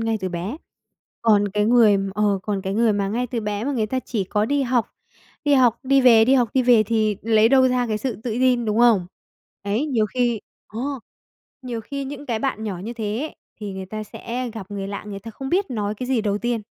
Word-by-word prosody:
ngay 225 -1 0
từ 185 - -2
bé, 180 - -4 0.7
còn 210 -3 +4
cái 210 +1 0
người 225 -3 +5 0.2
ờ, 205 -2 +1
còn 200 -2 -2
cái 190 0 -3
người 225 -1 +3
mà 200 -1 0
ngay 245 +4 -1
từ 235 -1 -3
bé 210 0 -3
mà 285 - -1
người 225 -5 0
ta 255 +4 -2
chỉ 215 -6 -3
có 210 +3 0
đi 280 +2 +1
học, 245 -2 +1 0.6
đi 290 -1 +3
học, 245 -3 +4
đi 270 +1 +3
về, 230 -3 +7
đi 260 - +4
học, 245 -4 +3
đi 260 - +3
về 240 -3 +5
thì 215 -2 0
lấy 220 0 +4
đâu 260 -1 +5
ra 250 -1 0
cái 215 - -1
sự 235 -1 -3
tự 225 +3 -5
tin, 245 0 +2
đúng 215 +2 0
không? 220 -7 +4 0.6
Đấy, 210 +9 0
nhiều 235 -7 +1
khi 240 -1 0 0.3
ờ, 220 +2 -7 0.8
nhiều 240 -3 -4
khi 280 +4 -5
những 285 +1 -7
cái 230 -3 -1
bạn 220 -4 -2
nhỏ 195 -4 -4
như 215 +6 -6
thế 220 -1 -3
ấy, 310 - -5 0.2
thì 205 -2 -5
người 190 0 -6
ta 215 +2 -6
sẽ 245 +4 -5
gặp 200 -2 -8
người 195 -1 -4
lạ, 200 +1 -6
người 200 -1 -6
ta 225 +3 -9
không 265 +5 -7
biết 370 -2 0
nói 210 -3 -2
cái 250 +4 -6
gì 255 -4 +2
đầu 205 -1 -1
tiên, 240 -2 -2
225 Hz, 245 wpm, -22 LUFS, 210-250 Hz, 0.8 s, về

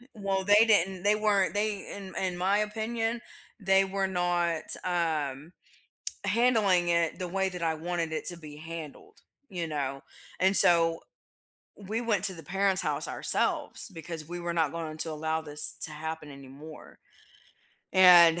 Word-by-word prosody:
Well, 195 -2 -2
they 205 +3 +5
didn't 190 -3 +1
they 205 +1 +3
weren't 205 -3 +1
they, 205 -1 -3
in 195 -2 -10
in 185 -2 -3
my 195 +3 +1
opinion, 225 +2 -3 0.4
they 195 -1 +2
were 195 0 -2
not, 175 -3 -1 0.2
um, 160 -4 -3 0.7
handling 205 -5 +2
it 170 -1 0
the 180 - -4
way 190 +2 -1
that 180 -2 -7
I 165 -1 0
wanted 170 0 -4
it 160 - -4
to 175 - -1
be 150 -3 -12
handled, 165 - -10 0.3
you 175 -4 -5
know, 140 -3 -4 0.4
and 190 +2 +3
so, 165 -2 +6 0.8
we 210 +3 -5
went 215 -6 -1
to 190 - +3
the 165 - -11
parents' 195 +3 0
house - - -1
ourselves - - +1
because 160 -1 -7
we 175 +1 -6
were 175 0 -4
not 160 -3 0
going 160 -2 -6
to 160 - +6
allow 160 +1 -3
this 150 -1 +2
to - - +1
happen 160 0 -7
anymore, 140 +3 -13 0.9
and 175 -3 +6
175 Hz, 155 wpm, -27 LUFS, 160-195 Hz, 0.9 s, so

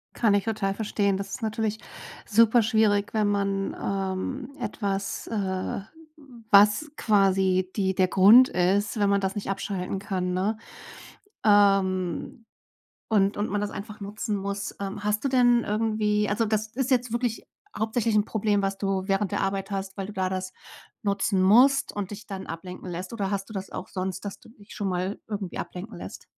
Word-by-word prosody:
Kann 220 -4 +3
ich 200 - +1
total 210 -3 -1
verstehen. 200 -2 0
Das 195 0 -5
ist - - -5
natürlich 220 0 -2 0.5
superschwierig, 220 -2 +3
wenn 215 -2 +2
man, 200 -1 -1
ähm, 195 +7 -3
etwas, 200 -4 -3
äh, 195 -3 -2 0.7
was 210 +9 +5
quasi 190 -3 +2
die 190 -2 0
der 185 -1 +3
Grund 215 +8 +7
ist, 200 +5 +1
wenn 200 -1 +3
man 200 0 +2
das 190 +2 -2
nicht 200 -1 -4
abschalten 195 -1 -3
kann, 185 -3 -2
ne? 205 +4 0 0.9
Ähm 195 - +2 0.6
und 200 -2 +2
und 205 +1 -1
man 205 0 0
das 205 - -2
einfach 210 +1 -8
nutzen 205 +1 -3
muss, 200 +1 -4
ähm. 200 +1 -5
Hast 210 +4 0
du - - +2
denn 245 -2 +4
irgendwie 210 -1 0
also, 210 +3 +1
das 215 0 -1
ist 265 0 -1
jetzt 245 -2 +1
wirklich 235 -1 -2 0.3
hauptsächlich 220 +1 0
'n 210 - +4
Problem, 210 -2 0
was 195 0 -1
du 195 -1 -1
während 195 -1 0
der - - 0
Arbeit 195 +1 -2
hast, 195 0 -4
weil 195 -1 -4
du 210 - -8
da 190 -1 -1
das 185 0 -4 0.5
nutzen 200 -1 +1
musst 250 +8 +5
und 205 -2 -4
dich 210 +1 -9
dann 195 -1 -6
ablenken 180 +3 -7
lässt? 180 +4 -6
Oder 200 -4 -2
hast 195 0 -3
du - - -10
das 195 -1 -5
auch 185 - -6
sonst, 185 0 -4
dass 200 - -6
du - - -18
dich 210 -2 -15
schon 200 -2 -2
mal 185 +2 -2
irgendwie 200 -4 -5
ablenken 185 +6 -6
lässt? - - -9
200 Hz, 175 wpm, -26 LUFS, 195-215 Hz, 0.9 s, Grund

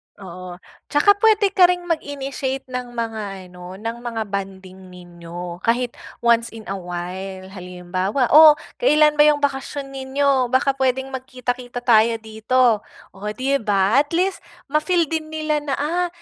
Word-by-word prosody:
Oo, 185 -2 -9 0.3
tsaka 295 +8 +4
puwede 420 -2 +4
ka 365 -2 +6
ring 355 0 -1
mag-initiate 275 -5 -3
ng 250 -1 -4
mga 205 -5 -5
ano, 180 +1 -10
ng 225 +4 -5
mga 235 -2 -4
bonding 190 -2 -7
ninyo 175 -1 -9
kahit 240 +3 0 0.3
once 235 0 +3
in 220 - -9
a 195 - -3
while. 185 +2 -6
Halimbawa, 185 +5 -2
oh 305 0 +9 0.2
kailan 300 -9 +4
ba 295 - +8
'yong 290 -1 +2
bakasyon 275 0 -2
ninyo? 270 -1 +1
Baka 260 +2 +2
puwedeng 265 0 -1
magkita-kita 250 -1 -5
tayo 230 -1 +4
dito. 220 +1 +2 0.3
Oh 210 - -8
'di 260 +6 -1
ba? 205 +2 +2
At 290 +3 -1
least, 375 +2 0 0.3
ma-feel 310 +4 +2
din 320 -1 -2
nila 310 -1 -1
na 285 -2 -3
ah, 345 +5 -1
245 Hz, 150 wpm, -21 LUFS, 195-285 Hz, 0.3 s, oh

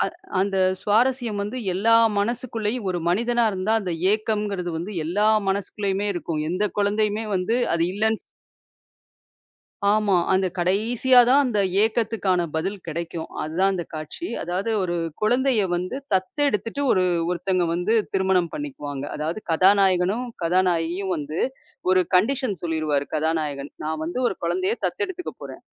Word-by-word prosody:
அந் 350 - -22
அந்த 195 0 0 0.2
சுவாரஸ்யம் 230 -1 +1
வந்து 220 +5 -5 0.2
எல்லா 225 +5 +4 0.2
மனசுக்குள்ளயும் 225 -1 -2
ஒரு 175 - -2
மனிதனா 235 +5 +2
இருந்தா 195 +3 -1
அந்த 180 -3 -3 0.2
ஏக்கம்ங்கறது 210 -4 -1
வந்து 180 +6 -5
எல்லா 205 +6 +1 0.2
மனசுக்குள்ளயுமே 200 +1 -1
இருக்கும். 165 -2 -3
எந்தக் 200 +4 -1
குழந்தையுமே 210 +1 +1
வந்து 205 +6 0 0.2
அது 165 0 +2
இல்லன்னு 220 +2 +1 1.7
ஆமா. 210 -2 +2 0.2
அந்தக் 185 -1 0
கடைசியா 225 +8 +3
தான் 280 +2 +6
அந்த 215 -5 0 0.2
ஏக்கத்துக்கான 215 -6 +1
பதில் 190 +6 -2
கிடைக்கும். 165 0 -4
அதுதான் 185 +6 +1
அந்தக் 175 -3 -5
காட்சி. 155 - -6 0.2
அதாவது 185 +6 -2
ஒரு 175 -1 -1 0.3
குழந்தையை 245 -1 +3
வந்து 180 +9 -3 0.2
தத்தெடுத்துட்டு 230 +5 0
ஒரு 185 - +3 0.3
ஒருத்தங்க 180 0 0
வந்து 180 +6 0 0.2
திருமணம் 190 -3 +2
பண்ணிக்குவாங்க. 150 - -5
அதாவது, 160 +7 -3
கதாநாயகனும் 190 +4 +3 0.2
கதாநாயகியும் 180 +1 +1
வந்து, 150 +2 -4 0.5
ஒரு 185 0 +5
கண்டிஷன் 250 +1 +2
சொல்லிருவாரு 155 -4 0
கதாநாயகன் 150 -3 -1
"நான் 155 0 -3
வந்து 170 +9 -4
ஒரு - - -2
குழந்தையைத் 380 +5 -1
தத்தெடுத்துக்கப் 375 -5 -4
போறேன். - - -9
195 Hz, 130 wpm, -23 LUFS, 175-225 Hz, 1.7 s, தான்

